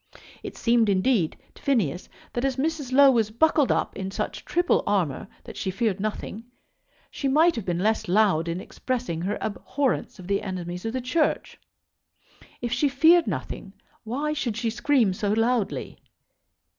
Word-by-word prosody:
It - - -8
seemed, 230 -2 +3
indeed, 195 -3 +2 0.2
to - - -18
Phineas 195 - 0 0.2
that 240 - -2
as 270 -1 +1
Mrs. 290 -1 -2
Low 275 +1 +7
was 225 -4 +2
buckled 295 +4 +3
up - - 0
in 190 -1 -4
such 195 - -4
triple 350 0 +2
armour 175 -10 0 0.2
that - - -10
she 190 - -3
feared 200 0 -1
nothing, 215 +2 -4 0.7
she 280 - -3
might 315 +5 +4
have 225 -5 -4
been 175 -2 -1
less 220 +3 0
loud 185 -4 +3
in 170 +1 -2
expressing 235 -5 -4
her 200 +4 -2
abhorrence 260 +5 -2
of 185 - -11
the 200 +1 0
enemies 180 -1 -5
of 225 - -2
the 260 - -2
Church. 300 +6 -1 1.0
If 240 -1 -2
she 280 +4 +2
feared 320 +5 +5
nothing, - - -5 0.3
why 280 +7 -2
should 240 -8 -2
she 235 -1 -1
scream 235 -4 +2
so 205 +1 -1
loudly? 225 -1 0
225 Hz, 165 wpm, -25 LUFS, 195-270 Hz, 1.0 s, Low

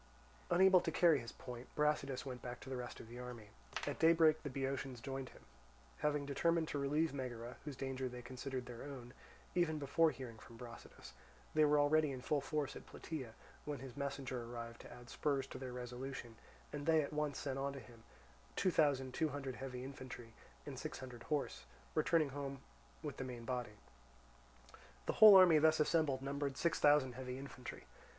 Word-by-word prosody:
Unable 185 +1 +6
to - - -1
carry 165 -5 +5
his 115 -1 -7
point, 125 0 -8
Brasidas 150 -3 +1
went 125 -2 -5
back 120 -1 -6
to 135 - -8
the - - -1
rest 125 -1 -5
of - - -10
the 120 +2 -9
army. 120 -4 -8 0.4
At 145 - -3
daybreak 160 -1 +6
the 145 - -4
Boeotians 135 -1 -3
joined 135 +2 -4
him. - - -16 0.6
Having 150 -1 +1
determined 165 +3 +2
to 145 - -1
relieve 150 +3 +1
Megara, 125 -3 -5
whose 145 -3 -5
danger 130 -1 -3
they 125 0 -8
considered 130 +1 -4
their 120 -2 -8
own, 130 -4 -8 0.4
even 170 -3 +2
before 160 +3 +3
hearing 125 -5 -7
from 115 - -13
Brasidas, 120 0 -10 0.4
they 155 0 +5
were 150 0 +5
already 150 0 +4
in 130 -2 -5
full 145 +1 +1
force 150 -2 -2
at - - -10
Plataea, 130 -9 -6 0.3
when 150 -1 -3
his 130 -2 -9
messenger 135 -3 -3
arrived 115 0 -7
to - - -11
add 120 0 -11
spurs 140 -3 0
to 130 - -8
their 130 -1 -5
resolution; 125 -1 -6 0.4
and 145 0 -4
they 160 -1 +5
at 140 - -6
once 150 -2 -1
sent 135 -1 -3
on 140 +1 -1
to 140 - -6
him 115 -1 -14 0.5
two 185 - +2
thousand 135 -5 +2
two 160 +3 +1
hundred 135 -2 -4
heavy 125 -1 -5
infantry, 130 -4 -8 0.3
and - - -6
six - - -5
hundred 125 -3 -8
horse, 150 - -1 0.3
returning 155 - +3
home 140 -1 -5 0.4
with 145 -3 -4
the - - -3
main 125 -2 -6
body. 120 -4 -3 1.3
The - - 0
whole 215 -2 +13
army 180 -5 +9
thus 155 +1 +5
assembled 150 -4 +2
numbered 140 0 -2
six 170 - +1
thousand 145 -3 +5
heavy 125 0 -5
infantry. 135 -2 -8
135 Hz, 185 wpm, -38 LUFS, 125-150 Hz, 1.3 s, whole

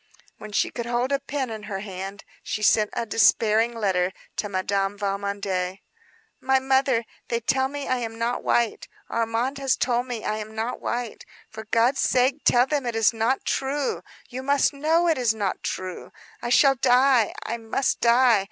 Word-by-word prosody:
When 215 - -9
she - - +1
could 235 -1 -5
hold 240 +2 0
a 280 - +2
pen 275 -3 -4
in 220 -1 -6
her 195 -1 -4
hand, 195 0 -7 0.2
she 215 - -4
sent 210 0 +4
a 235 - -2
despairing 225 +1 +3
letter 190 -4 0 0.3
to 205 - -2
Madame 195 +1 -1
Valmondé. 200 -2 -2 0.6
"My 265 0 +2
mother, 265 -3 +2 0.2
they 235 - -1
tell 265 +3 +1
me 285 +1 -6
I 255 - +1
am 225 -2 -5
not 235 +1 -1
white. 235 -2 0 0.2
Armand 230 +4 -1
has 270 -2 +1
told 245 0 0
me 240 -3 -5
I 215 - -1
am 215 0 -7
not 225 +3 -3
white. 240 -2 -4 0.3
For 220 0 -8
God's 230 +5 +2
sake 255 +3 +2
tell 245 +1 +4
them 280 -2 -2
it 235 - -2
is 225 0 +3
not 230 +4 0
true. 275 +1 -1 0.3
You 255 +1 -6
must 280 +2 +2
know 320 +5 +2
it 320 -5 +2
is 230 -3 +2
not 200 -3 -2
true. 185 -1 -5 0.3
I 240 - -3
shall 270 +3 +5
die. 255 -2 +3
I 235 - -3
must 230 +4 -1
die. 235 -1 +5
235 Hz, 180 wpm, -24 LUFS, 215-260 Hz, 0.6 s, shall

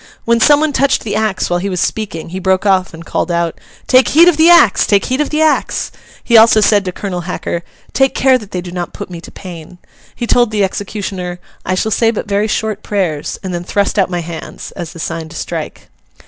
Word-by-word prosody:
When 235 0 +3
some 290 +5 +5
one 310 -2 0
touched 275 0 +2
the 205 -2 -3
axe 215 -3 0
while 175 0 0
he 200 +3 -3
was 180 -2 -2
speaking, 180 -7 -3
he 185 +2 -5
broke 190 +1 +1
off 190 -2 +2
and 165 +1 -11
called - - -2
out, 170 -1 -1 0.2
'Take 255 0 +4
heed 335 +4 +6
of 355 - +5
the 320 +2 +5
axe! 340 - +5
take 200 -2 +3
heed 260 +3 0
of 300 - -1
the 310 +1 +1
axe!' 310 - 0 0.3
He 235 - +1
also 220 0 +7
said 205 -1 +3
to 185 - -2
Colonel 180 -1 -4
Hacker, 170 -1 -3 0.3
'Take 270 0 +2
care 260 -1 +4
that 210 -4 -12
they 180 -3 -4
do 175 0 -8
not 175 -1 -5
put 205 -3 -8
me 170 -1 -7
to - - -11
pain.' 175 -2 -10 0.4
He 240 - -3
told 240 0 +3
the 210 -2 0
executioner, 190 -2 -4 0.3
'I 185 - +1
shall 220 +4 -1
say 225 +2 +3
but 225 -1 -3
very 205 +1 0
short 215 -1 -2
prayers, 175 -8 -2
and 185 -1 -4
then 175 0 -3
thrust 200 +3 0
out 190 - +2
my 175 -1 -2
hands'—as 170 +1 -8
the - - -12
sign 160 0 -4
to 165 - -12
strike. - - -6
200 Hz, 230 wpm, -15 LUFS, 175-225 Hz, 0.4 s, also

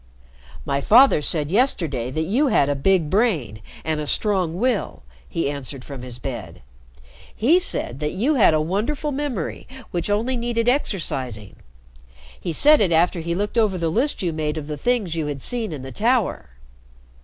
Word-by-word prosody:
"My 140 0 -1
father 240 - +6
said 150 0 0
yesterday 165 - +1
that 155 +5 -2
you 240 - +1
had 145 - +3
a 145 - +1
big 170 +3 +2
brain 160 - 0 0.2
and 160 -1 -1
a 150 - -4
strong 185 -5 +1
will," 235 - -1 0.3
he 165 - -1
answered 140 -2 -6
from 140 -3 -8
his 125 -1 -8
bed. 110 -10 -7 0.7
"He 305 +11 +4
said 140 - -1
that 150 0 -2
you 235 +12 +1
had 215 - +4
a 155 - +2
wonderful 225 - -2
memory 270 - -4 0.2
which 175 +2 -2
only 225 +5 0
needed 235 -1 -1
exercising. 135 - -1 0.8
He - - -4
said 295 - +5
it 190 -4 +2
after 170 +2 +2
he 170 +1 -3
looked 205 +5 -1
over 210 -4 +2
the 165 -2 -1
list 255 - 0
you 170 -2 -1
made 155 0 -2
of 155 - -5
the 150 0 -5
things 215 - -1
you 160 -2 -2
had 145 -2 -4
seen 235 -5 -1
in 145 -4 -6
the 135 - -8
Tower." 225 - 0
170 Hz, 180 wpm, -22 LUFS, 145-230 Hz, 0.8 s, father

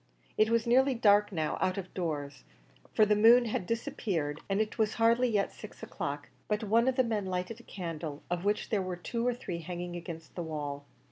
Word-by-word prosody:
It 215 0 +3
was 230 0 +2
nearly 260 +3 +4
dark 210 -2 +4
now 160 -5 -2
out 185 +1 +1
of 185 -2 -6
doors, 145 -5 -4 0.5
for 215 - +5
the 210 0 +3
moon 235 +3 +7
had 215 -5 -2
disappeared, 200 - -2
and 195 +1 +1
it 215 +1 -2
was 215 -1 +1
hardly 230 +2 +4
yet 205 -3 +1
six - - -11
o'clock; - - -5 0.2
but 210 +1 -1
one 230 +4 +3
of 260 - +2
the 255 - +4
men 215 -5 -1
lighted 185 +5 -3
a - - -14
candle, 160 -5 -5
of 175 0 -2
which 205 +1 0
there 210 -3 +2
were 185 -1 -4
two 230 +6 -2
or 250 - +2
three 180 -8 -5
hanging 175 +1 -5
against 165 -2 -8
the 175 - -4
wall. 145 -3 -4
200 Hz, 210 wpm, -31 LUFS, 175-230 Hz, 0.5 s, moon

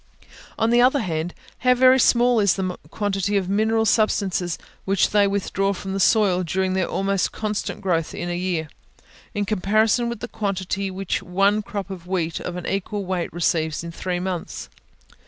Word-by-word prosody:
On 225 0 +2
the 240 0 +5
other 260 +2 +4
hand, 170 -3 -3 0.2
how 250 0 +4
very 255 +1 +6
small 245 -1 +4
is 200 -4 +3
the 185 -2 -2
quantity 205 -1 -1
of 190 -2 -1
mineral 220 +3 +2
substances 195 -5 +1 0.3
which 195 0 +2
they 205 -1 +4
withdraw 195 0 0
from 190 0 -6
the 195 - -2
soil 195 -3 +4
during 185 +2 -1
their 190 -1 0
almost 195 -1 0
constant 210 -1 -3
growth 165 -4 -1
in 175 - -4
one 175 0 -2
year, 175 -4 -1 0.7
in 205 0 0
comparison 215 +4 +2
with 235 - -5
the 240 - -5
quantity 195 -2 -2
which 190 0 -2
one 195 +3 +2
crop 200 -1 -5
of 180 -2 -8
wheat 170 -3 -1
of 175 - -5
an 180 - -6
equal 200 +1 -2
weight 180 -2 -2
receives 160 -2 0
in 170 - -6
three 180 +1 -3
months! 180 -2 -4
195 Hz, 175 wpm, -23 LUFS, 180-210 Hz, 0.7 s, very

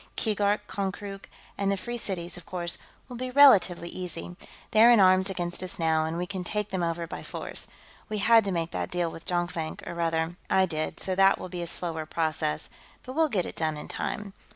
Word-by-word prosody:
"Keegark, 210 -1 +1
Konkrook, 195 0 -5 0.3
and 200 0 +1
the 200 - 0
Free 240 +5 -5
Cities, 180 -6 +1
of 180 - -7
course, 175 +1 -1 0.3
will 250 -2 -8
be 255 +1 -3
relatively 230 -11 +6
easy. 180 -1 -6 0.4
They're 220 +2 +7
in 240 -2 +7
arms 185 0 +5
against 175 -2 -2
us 185 -1 -3
now, 160 -1 +2
and 160 +1 -3
we 175 - -1
can 185 -1 -5
take 210 +3 -2
them 190 -2 -1
over 170 0 -1
by 165 - -7
force. - - -4 0.4
We 215 - -2
had 225 +2 +5
to 195 - -1
make 170 -2 -1
that - - -3
deal 175 -2 -1
with 165 - -11
Jonkvank, 175 -3 -2
or, - - -4
rather, 165 0 -1
I 190 0 +4
did, 155 -3 -2
so 190 - -2
that 195 +1 +5
will 185 - -7
be 175 -1 -5
a 170 - -4
slower 160 -2 -3
process, 155 - -1 0.4
but 255 - -7
we'll 320 +1 +2
get 195 -8 0
it - - -7
done 155 -2 -1
in - - -7
time. 205 -2 -4
180 Hz, 215 wpm, -27 LUFS, 170-200 Hz, 0.4 s, They're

